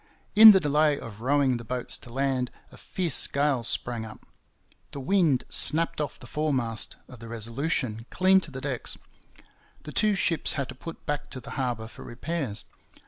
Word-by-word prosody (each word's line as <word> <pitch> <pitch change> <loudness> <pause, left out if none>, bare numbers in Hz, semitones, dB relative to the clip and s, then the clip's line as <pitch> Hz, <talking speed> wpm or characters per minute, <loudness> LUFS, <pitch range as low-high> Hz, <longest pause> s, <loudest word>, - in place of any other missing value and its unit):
In 220 +1 +12
the 195 - +5
delay 150 -2 +2
of 110 -4 -9
rowing 135 0 +2
the 115 - -8
boats 125 +2 -3
to - - -12
land 130 -1 0 0.2
a - - -13
fierce 180 -4 +1
gale 140 -3 +1
sprang 115 0 -3
up. 110 -1 -11 0.7
The 140 - -5
wind 150 -3 +2
snapped 165 0 +3
off 145 -1 -4
the - - -12
foremast 130 -5 -2
of 125 - -13
the 115 - -10
Resolution 115 0 -3
clean 190 +1 +4
to 185 - -6
the 135 -2 -7
decks. 130 -4 -3 0.9
The - - -8
two 210 -1 +2
ships 170 -4 +1
had 140 -3 -3
to - - -6
put 165 +6 -10
back 145 0 -3
to 130 - -7
the 130 +2 -10
harbour 120 -5 -2
for - - -13
repairs. 125 -4 -4
135 Hz, 180 wpm, -27 LUFS, 120-155 Hz, 0.9 s, In